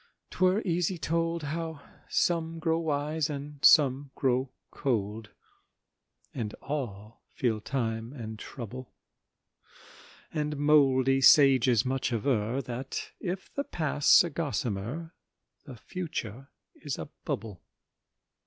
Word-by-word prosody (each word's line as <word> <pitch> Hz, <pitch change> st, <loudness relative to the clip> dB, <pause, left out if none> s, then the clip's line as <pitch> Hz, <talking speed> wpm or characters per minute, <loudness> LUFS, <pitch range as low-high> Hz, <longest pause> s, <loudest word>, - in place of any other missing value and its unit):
'twere 185 Hz, +4 st, +2 dB
easy 175 Hz, 0 st, 0 dB
told 165 Hz, +2 st, -1 dB
How 160 Hz, +1 st, -4 dB, 0.3 s
some 165 Hz, -1 st, 0 dB
grow 165 Hz, 0 st, 0 dB
wise 150 Hz, 0 st, -1 dB
and 145 Hz, 0 st, -7 dB
some 140 Hz, -2 st, +6 dB
grow 130 Hz, 0 st, +1 dB, 0.2 s
cold, 110 Hz, -4 st, -2 dB, 1.0 s
And 110 Hz, -5 st, -4 dB
all 115 Hz, -7 st, -6 dB
feel 115 Hz, -4 st, 0 dB
time 115 Hz, -2 st, -2 dB
and 110 Hz, -5 st, -7 dB
trouble; 125 Hz, 0 st, -8 dB, 1.4 s
And 150 Hz, -1 st, -2 dB
mouldy 135 Hz, -3 st, +4 dB
sages 130 Hz, -5 st, +6 dB
much 130 Hz, 0 st, -1 dB
aver 115 Hz, +2 st, 0 dB
That 125 Hz, +2 st, -5 dB
if 185 Hz, +1 st, -5 dB
the 280 Hz, -, -1 dB
Past's 155 Hz, -, +4 dB
a 170 Hz, -, -4 dB
gossamer, 140 Hz, -, -3 dB, 0.5 s
The 135 Hz, -5 st, -9 dB
Future 135 Hz, -, -6 dB, 0.2 s
is 145 Hz, -4 st, -5 dB
a 80 Hz, -, -6 dB, 0.2 s
bubble. 105 Hz, -4 st, -4 dB
140 Hz, 105 wpm, -29 LUFS, 120-160 Hz, 1.4 s, some